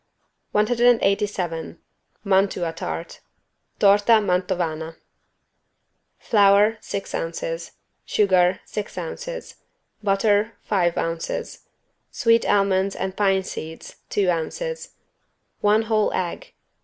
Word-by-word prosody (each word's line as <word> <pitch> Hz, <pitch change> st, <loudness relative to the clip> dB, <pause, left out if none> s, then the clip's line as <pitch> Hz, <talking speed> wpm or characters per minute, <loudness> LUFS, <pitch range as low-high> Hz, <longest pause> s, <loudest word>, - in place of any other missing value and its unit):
187 210 Hz, -7 st, +1 dB, 0.5 s
MANTUA 190 Hz, -4 st, +1 dB
TART 165 Hz, 0 st, -6 dB, 0.6 s
(Torta 205 Hz, +3 st, +5 dB
Mantovana) 175 Hz, -4 st, -1 dB, 1.2 s
Flour, 205 Hz, +1 st, +4 dB
six 195 Hz, -, -5 dB
ounces. 165 Hz, 0 st, -4 dB, 0.3 s
Sugar, 185 Hz, -3 st, +2 dB
six 210 Hz, -2 st, -6 dB
ounces. -, -, -6 dB, 0.4 s
Butter, 205 Hz, +2 st, +2 dB
five 175 Hz, -5 st, +1 dB
ounces. 165 Hz, 0 st, -4 dB, 0.4 s
Sweet 230 Hz, -1 st, +2 dB
almonds 195 Hz, -1 st, +2 dB
and 190 Hz, 0 st, -4 dB
pine 195 Hz, -2 st, +2 dB
seeds, 160 Hz, -3 st, -8 dB
two 195 Hz, -3 st, +2 dB
ounces. 485 Hz, -, -4 dB, 0.6 s
One 210 Hz, +2 st, +3 dB
whole 215 Hz, -1 st, +1 dB
egg. 185 Hz, -, -4 dB
195 Hz, 85 wpm, -23 LUFS, 175-210 Hz, 1.2 s, Torta